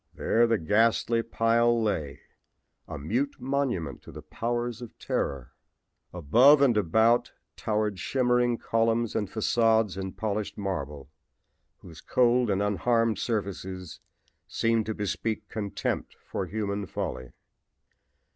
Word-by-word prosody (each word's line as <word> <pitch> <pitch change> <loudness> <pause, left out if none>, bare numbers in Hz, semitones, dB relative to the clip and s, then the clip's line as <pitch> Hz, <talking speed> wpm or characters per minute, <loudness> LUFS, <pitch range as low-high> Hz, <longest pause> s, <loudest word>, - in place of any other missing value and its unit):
There 115 +1 +2
the 115 -1 +2
ghastly 115 +5 +2
pile 115 +1 +2
lay, 80 - -2 0.7
a 80 - -6
mute 120 - -2
monument 125 - -2
to - - -12
the 75 - -10
powers 120 +7 -3
of 120 - -10
terror. 65 -3 -3 0.6
Above 120 - +5
and 135 -4 +4
about 110 +5 +2 0.2
towered 105 -3 -1
shimmering 125 -2 +1
columns 115 0 0
and 105 -3 -1
facades 110 -2 +2
in 95 -1 -5
polished 105 -1 -3
marble, 75 -9 -5 0.7
whose 80 -3 -12
cold 125 -1 +2
and 100 0 +1
unharmed 115 +1 +1
surfaces 95 -5 -4 0.5
seemed 115 -1 0
to 110 - -2
bespeak 105 +2 -3
contempt 100 -2 -3
for - - -4
human 100 -2 -3
folly. 65 -1 -5
110 Hz, 120 wpm, -27 LUFS, 95-120 Hz, 0.7 s, Above